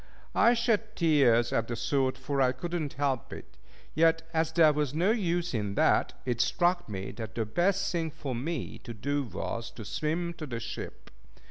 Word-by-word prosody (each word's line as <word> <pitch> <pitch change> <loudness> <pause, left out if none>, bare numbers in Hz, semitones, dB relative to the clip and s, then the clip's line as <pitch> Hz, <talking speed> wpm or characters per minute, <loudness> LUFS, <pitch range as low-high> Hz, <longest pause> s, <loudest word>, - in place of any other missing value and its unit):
I 240 - +5
shed 225 -2 0
tears 135 -8 +4
at 115 0 +1
the 120 - -3
thought, 130 +2 0
for 135 +1 -1
I 130 -1 +3
could 175 +5 -6
not 155 -5 -2
help 135 -4 -1
it; - - -10 0.4
yet, 165 +1 +3
as 160 -1 +1
there 160 -2 +5
was 150 -2 -1
no 180 +6 +3
use 175 - 0
in 105 -3 -2
that, - - +3
it 120 -2 0
struck 175 - +1
me 95 -2 -5
that 110 -1 -7
the 115 -2 0
best 180 - +1
thing 165 -2 -1
for 145 -3 -5
me 140 +5 -4
to 120 - -8
do 140 +7 -1
was 115 +3 -4
to 110 - -8
swim 165 - -2
to 155 - -5
the 120 -3 -4
ship. 115 +1 -7
145 Hz, 195 wpm, -29 LUFS, 120-170 Hz, 0.4 s, I